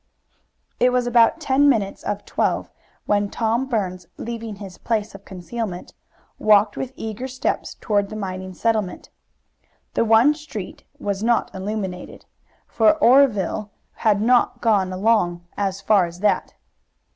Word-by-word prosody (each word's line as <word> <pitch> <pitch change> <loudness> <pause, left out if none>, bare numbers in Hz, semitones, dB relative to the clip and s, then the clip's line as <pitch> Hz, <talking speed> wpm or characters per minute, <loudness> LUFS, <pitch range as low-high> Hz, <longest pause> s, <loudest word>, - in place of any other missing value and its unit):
It 250 +1 +4
was 250 -1 +1
about 240 +4 +4
ten 285 -1 +3
minutes 210 -7 0
of 205 0 -4
twelve - - -1 0.3
when 205 -1 +1
Tom 230 +4 0
Burns, 185 -7 -2
leaving 230 -2 -6
his 195 -2 -10
place 220 -2 -2
of 195 0 -13
concealment, 190 0 -6 0.5
walked 210 -1 +4
with 260 -1 -4
eager 220 +3 -5
steps 255 0 -3
toward 205 -2 0
the 215 - -7
mining 185 -2 -5
settlement. 215 -4 -1 0.8
The - - +2
one 230 +6 +5
street 295 -11 -8
was 200 -1 -3
not 235 +1 +1
illuminated, 190 -2 -5 0.4
for 220 +5 +3
Oreville 235 - +3 0.2
had 210 -2 +1
not 245 +1 +3
got 205 -5 +2
along 185 -3 +1
as 195 -1 -2
far 195 -3 +3
as 170 +2 -11
that. 210 - +1
215 Hz, 135 wpm, -22 LUFS, 195-235 Hz, 0.8 s, one